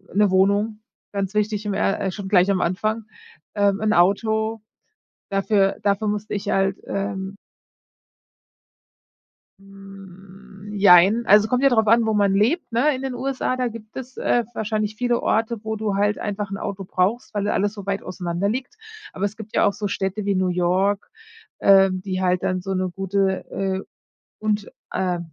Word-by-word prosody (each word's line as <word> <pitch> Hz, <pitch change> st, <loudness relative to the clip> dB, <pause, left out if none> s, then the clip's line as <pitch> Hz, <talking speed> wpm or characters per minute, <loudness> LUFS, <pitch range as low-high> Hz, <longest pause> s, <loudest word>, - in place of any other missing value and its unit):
'ne 205 Hz, 0 st, +4 dB
Wohnung, 200 Hz, +3 st, +2 dB, 0.3 s
ganz 195 Hz, -1 st, -2 dB
wichtig 210 Hz, 0 st, -1 dB
im 205 Hz, -, -1 dB
er 195 Hz, 0 st, 0 dB
äh, 190 Hz, -, -1 dB
schon 200 Hz, 0 st, -7 dB
gleich 190 Hz, 0 st, +4 dB
am 190 Hz, -, +1 dB
Anfang. 215 Hz, +5 st, -1 dB, 0.5 s
Ähm, 200 Hz, -1 st, +2 dB
'n 215 Hz, 0 st, +2 dB
Auto, 220 Hz, +4 st, +2 dB, 0.7 s
dafür 195 Hz, 0 st, +1 dB
dafür 205 Hz, +1 st, +1 dB
musste 210 Hz, 0 st, -3 dB
ich 205 Hz, 0 st, -4 dB
halt, 195 Hz, 0 st, +1 dB
ähm 195 Hz, 0 st, -4 dB, 2.2 s
Hm, 195 Hz, 0 st, -14 dB
jein. 200 Hz, +3 st, +6 dB
Also, 210 Hz, +1 st, +6 dB
kommt 250 Hz, +3 st, 0 dB
ja 275 Hz, -, +6 dB
drauf 220 Hz, -4 st, +2 dB
an, 230 Hz, +1 st, +5 dB
wo 220 Hz, -, +1 dB
man 200 Hz, -2 st, +2 dB
lebt, 235 Hz, -, +1 dB
ne? 265 Hz, +6 st, +2 dB
In 255 Hz, -, -6 dB
den 265 Hz, -1 st, -3 dB
USA, 260 Hz, 0 st, -2 dB
da 250 Hz, -1 st, 0 dB
gibt 220 Hz, -2 st, -10 dB
es, 260 Hz, 0 st, -8 dB
äh, 240 Hz, -, +1 dB
wahrscheinlich 215 Hz, -1 st, -2 dB
viele 240 Hz, +1 st, 0 dB
Orte, 225 Hz, 0 st, 0 dB
wo 220 Hz, 0 st, -3 dB
du 210 Hz, -2 st, -2 dB
halt 205 Hz, +1 st, +1 dB
einfach 205 Hz, -1 st, -4 dB
'n 195 Hz, -, -3 dB
Auto 200 Hz, -1 st, -5 dB
brauchst, 195 Hz, +8 st, -1 dB
weil 205 Hz, -1 st, -1 dB
da 205 Hz, -, 0 dB
alles 205 Hz, +1 st, 0 dB
so 200 Hz, -3 st, -9 dB
weit 200 Hz, 0 st, -2 dB
auseinander 180 Hz, +1 st, -2 dB
liegt. 260 Hz, -, -4 dB, 0.4 s
Aber 195 Hz, -, -2 dB
es 205 Hz, +1 st, -4 dB
gibt 220 Hz, -1 st, -9 dB
ja -, -, +4 dB
auch 200 Hz, -, +2 dB
so 205 Hz, 0 st, -3 dB
Städte 195 Hz, +2 st, -3 dB
wie 200 Hz, -1 st, +1 dB
New 185 Hz, 0 st, +1 dB
York, 185 Hz, +3 st, 0 dB, 0.5 s
ähm, 195 Hz, -1 st, +5 dB
die 185 Hz, -1 st, -3 dB
halt 180 Hz, -1 st, +1 dB
dann 185 Hz, 0 st, -1 dB
so 195 Hz, +1 st, -3 dB
'ne 185 Hz, 0 st, -1 dB
gute, 195 Hz, +1 st, -1 dB
äh 190 Hz, -1 st, -2 dB, 0.6 s
und 210 Hz, -1 st, -1 dB, 0.2 s
äh 180 Hz, -2 st, -1 dB
200 Hz, 180 wpm, -22 LUFS, 195-215 Hz, 2.2 s, jein